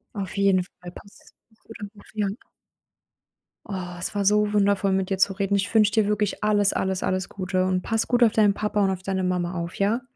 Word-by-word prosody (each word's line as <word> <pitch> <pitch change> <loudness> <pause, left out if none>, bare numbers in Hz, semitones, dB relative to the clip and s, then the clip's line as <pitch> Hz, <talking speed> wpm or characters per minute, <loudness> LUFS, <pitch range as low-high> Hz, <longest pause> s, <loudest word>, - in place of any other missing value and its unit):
Auf 195 0 -5
jeden 195 -2 +3
Fall 175 -1 -13
passt's. 200 +2 -16 0.3
Guter 225 -1 -12
Move, 205 - -17
ja. 210 -2 0 1.4
Oh, 180 -3 -6
es 190 - -4
war 200 - 0
so 210 +1 +3
wundervoll 200 -1 +2
mit 190 0 -1
dir 195 - -1
zu 195 +1 +3
reden. 200 0 -1
Ich 200 +3 -1
wünsche 210 -2 +4
dir 215 -2 +2
wirklich 210 0 -1
alles, 205 -1 +3
alles, 190 -1 -1
alles 185 -1 -1
Gute 185 -1 -1
und 185 -1 0
pass 225 +2 -1
gut 245 0 +3
auf 225 - +5
deinen 210 -3 +3
Papa 210 -1 -1
und 195 - +2
auf 185 0 -5
deine 190 -1 -2
Mama 180 -1 -1
auf, 170 0 -5
ja? 215 +5 0
200 Hz, 215 wpm, -24 LUFS, 185-210 Hz, 1.4 s, auf